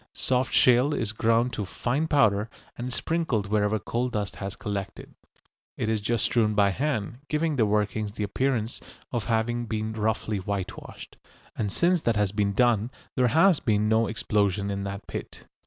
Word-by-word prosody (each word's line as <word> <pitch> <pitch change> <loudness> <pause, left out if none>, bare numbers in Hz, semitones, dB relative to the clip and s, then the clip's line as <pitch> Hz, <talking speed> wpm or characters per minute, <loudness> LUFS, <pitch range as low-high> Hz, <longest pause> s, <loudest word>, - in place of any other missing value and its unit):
Soft 130 0 0
shale 130 +4 +4
is 110 -3 -2
ground 115 +3 +1
to 105 - -2
fine 125 +10 -1
powder, 110 -8 +3 0.3
and 120 - -5
is 125 - -4
sprinkled 160 -11 -1
wherever 105 +1 +1
coal 120 +4 -2
dust 105 -4 -3
has 100 -1 -5
collected. 100 -2 -5 0.6
It 110 - -1
is 110 -2 0
just 115 +1 0
strewn 110 -3 +2
by 100 -1 +4
hand, 125 -2 -2
giving 155 0 0
the 115 -5 +2
workings 105 0 0
the 105 - -3
appearance 115 +2 -1 0.3
of 120 -3 -2
having 120 +1 0
been 110 0 -2
roughly 110 -1 -1
whitewashed. 95 -1 -6 0.4
And 105 -2 -2
since 175 - +2
that 115 -5 +1
has 105 -2 +1
been 100 -1 0
done 120 -1 +2 0.3
there 125 -1 +3
has 165 +7 +4
been 105 -2 +1
no 110 0 +3
explosion 100 -2 0
in 100 0 -3
that 100 +1 -6
pit. - - -7
110 Hz, 170 wpm, -26 LUFS, 105-125 Hz, 0.6 s, shale